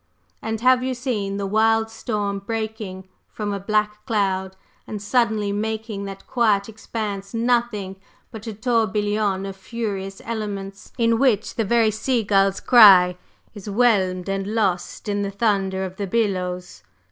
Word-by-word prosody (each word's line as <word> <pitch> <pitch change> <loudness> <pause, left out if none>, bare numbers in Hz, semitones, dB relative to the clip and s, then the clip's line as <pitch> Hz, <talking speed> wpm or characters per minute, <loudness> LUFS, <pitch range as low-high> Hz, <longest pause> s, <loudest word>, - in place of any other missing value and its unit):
And 225 0 -3
have 255 0 +5
you 260 0 -1
seen 215 -6 -2
the 200 - -2
wild 220 +2 +2
storm 210 -3 -2
breaking 215 -3 -5 0.2
from 210 -2 -4
a 200 - -3
black 210 +1 -1
cloud 190 -4 0 0.3
and 210 - -5
suddenly 215 -1 +1
making 215 0 -3
that 195 0 -8
quiet 215 -5 +2
expanse 215 -2 -5
nothing 230 -5 0 0.3
but 220 -1 -9
a 220 - -4
tourbillon 210 -3 0
of 195 -1 -6
furious 195 -2 -5
elements, 200 -3 -5
in 230 -1 +2
which 230 -6 +2
the 225 - -1
very 225 +1 +3
sea 230 +2 0
gull's 195 -1 +2
cry 195 -7 +7 0.4
is 205 -1 -8
whelmed 195 -5 +2
and 195 0 -2
lost 195 -2 -1
in 205 0 -1
the 200 - -1
thunder 195 -2 0
of 185 0 -8
the 200 - -3
billows? 180 -4 -2
210 Hz, 145 wpm, -22 LUFS, 195-225 Hz, 0.4 s, cry